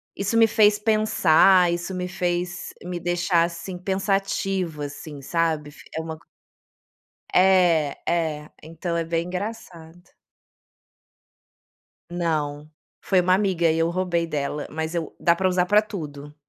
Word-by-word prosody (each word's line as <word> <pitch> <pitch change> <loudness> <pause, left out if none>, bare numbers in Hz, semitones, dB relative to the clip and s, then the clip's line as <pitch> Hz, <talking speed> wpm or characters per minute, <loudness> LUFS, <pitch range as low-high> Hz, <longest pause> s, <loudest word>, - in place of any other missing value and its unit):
"Isso 200 +3 -1
me 225 0 +6
fez 210 -1 +4
pensar", 195 -4 +4
"Isso 175 +2 -4
me 180 0 -3
fez, 175 0 -3
me 175 -1 -5
deixar, 175 0 +1
assim, 175 +2 -5
pensativa", 195 -4 -1
assim, 145 0 -9
sabe, 160 -1 -1
fic - - -17
é - - -1
uma 160 -1 -6 1.2
É, 180 -6 +4
é, 155 -3 -1
então 165 +2 -4
é 165 - 0
bem 165 +1 -2
engraçado. 180 -4 -7 2.0
Não, 155 -4 -2 0.3
foi 185 -2 +3
uma 185 +1 +3
amiga 185 -5 +2
e 160 - 0
eu 165 +1 +1
roubei 175 -2 -1
dela, 150 -1 -3
mas 160 +2 -4
eu 165 -2 -3
dá 170 0 +3
para 190 - 0
usar 180 0 +1
para 210 +3 +4
tudo. 150 -7 -8
175 Hz, 135 wpm, -24 LUFS, 160-185 Hz, 2.0 s, me